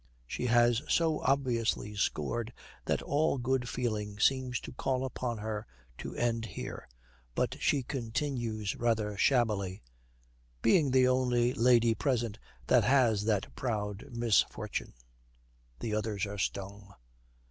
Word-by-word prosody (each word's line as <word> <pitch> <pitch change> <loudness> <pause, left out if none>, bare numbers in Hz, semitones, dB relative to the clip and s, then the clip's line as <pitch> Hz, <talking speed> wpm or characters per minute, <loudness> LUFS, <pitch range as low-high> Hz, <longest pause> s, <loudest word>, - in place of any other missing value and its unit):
She 125 - -3
has 120 0 +4
so 160 -2 +2
obviously 120 -6 0
scored 110 +5 -1 0.3
that - - 0
all 145 0 +1
good 125 0 0
feeling 105 -4 -2
seems 130 0 +2
to - - -8
call 130 +1 -1
upon 125 -2 -3
her 105 0 -4 0.3
to - - -6
end 115 -2 0
here. 95 - -7 0.5
But - - 0
she 140 -3 +2
continues 120 -4 -2
rather 110 -3 0
shabbily, 100 - +1 0.8
'Being 145 +5 +4
the 130 0 +4
only 125 -1 +2
lady 120 -1 +4
present 115 0 -1 0.3
that - - +4
has 120 -6 +3
that 105 -3 0
proud 105 -4 -3
misfortune.' 115 -4 0 0.9
The 110 - -2
others 105 -1 -1
are 100 0 -6
stung. 100 +1 -4
115 Hz, 125 wpm, -31 LUFS, 105-125 Hz, 0.9 s, has